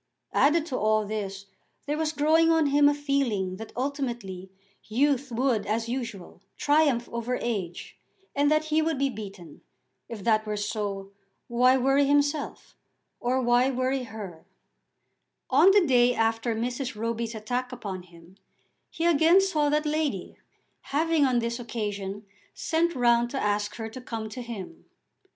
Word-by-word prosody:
Added 305 +2 +3
to 260 -6 -3
all 215 0 +2
this 200 -2 -5 0.4
there 295 - -1
was 310 0 -1
growing 320 +2 +3
on 325 -1 +4
him 285 +1 +5
a - - +2
feeling 255 -11 -1
that 225 - -8
ultimately 240 -9 -3 0.4
youth 270 +3 +1
would 235 -3 0
as 225 +2 -1
usual 235 -8 -5 0.2
triumph 290 -5 +2
over 235 +2 -2
age, 190 -7 -4 0.4
and 285 +1 +3
that 310 0 +3
he 315 - +4
would 320 -2 0
be 275 0 +1
beaten. 195 - -10 0.5
If 220 -4 -7
that 215 0 +3
were 210 0 -2
so, 205 -2 -3 0.4
why 250 +2 +4
worry 270 +2 +3
himself, 290 +1 0 0.4
or 255 +2 0
why 245 +2 +4
worry 260 +1 0
her? 200 -8 -9 1.0
On 375 - +7
the 390 -2 +5
day 245 -3 +4
after 225 +1 0
Mrs. 245 +2 -3
Roby's 230 +1 -3
attack 245 +4 -3
upon 200 -7 -6
him 175 +1 -18 0.5
he 330 - -3
again 335 +2 +5
saw 315 -7 +1
that 300 +1 +1
lady, 300 - -2 0.4
having 315 +1 +1
on 255 -2 +2
this 235 +1 -1
occasion 205 -3 -4 0.3
sent 335 +1 0
round 240 -1 +3
to 270 - -3
ask 205 0 -1
her 225 -1 -5
to 255 - -8
come 225 -3 -5
to 250 +3 -7
him. 235 - -8
245 Hz, 150 wpm, -27 LUFS, 215-285 Hz, 1.0 s, On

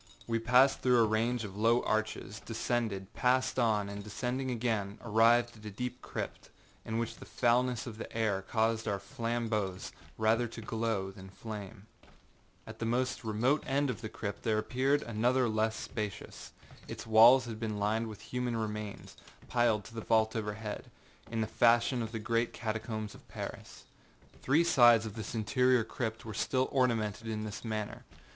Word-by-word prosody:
We 115 -1 0
passed 125 +4 +5
through 125 -1 +4
a 115 - +6
range 115 +2 0
of 100 -2 -7
low 115 +3 +3
arches, 110 -1 -2
descended, 110 -4 -2
passed 130 +1 +2
on, 110 -4 +2
and 100 0 -6
descending 125 +5 -3
again, 110 -4 -1
arrived 115 +2 +4
at 110 - -16
a - - -4
deep 125 +4 -5
crypt, - - -6 0.3
in 110 - -3
which 115 -1 -3
the - - -11
foulness 125 0 +1
of 115 -3 -8
the - - -7
air 110 -4 0
caused 115 +2 0
our 100 - 0
flambeaux 110 -3 -2 0.4
rather 115 +2 +2
to 115 - -9
glow 110 -3 -2
than 95 -1 -12
flame. 105 0 -8 0.8
At - - -10
the 115 - -2
most 130 +2 0
remote 115 +7 +1
end 140 0 +1
of - - -7
the 110 - -5
crypt 100 -1 -5
there 110 -2 +1
appeared 135 +6 +1
another 120 +3 +1
less 110 0 +1
spacious. 105 -5 -6 0.4
Its - - -7
walls 115 +4 +7
had 115 -2 -6
been 110 -2 -3
lined 110 +3 0
with 105 -2 -9
human 125 0 -2
remains, 105 -2 -5 0.3
piled 120 -3 +2
to - - -12
the 115 - -5
vault 110 0 +2
overhead, 105 -1 -4 0.4
in 115 -1 -2
the - - +1
fashion 120 +3 +3
of 110 -1 -4
the 115 - -3
great 115 +2 0
catacombs 110 -1 -4
of - - -16
Paris. - - -8 0.6
Three 150 +6 +3
sides 120 -9 +6
of 110 - -5
this 110 +1 -6
interior 125 +2 +3
crypt 110 -1 -4
were 110 - -6
still 130 +5 0
ornamented 115 -5 0
in 110 -1 -3
this 105 -1 -6
manner. 110 -2 -4
115 Hz, 170 wpm, -32 LUFS, 110-120 Hz, 0.8 s, walls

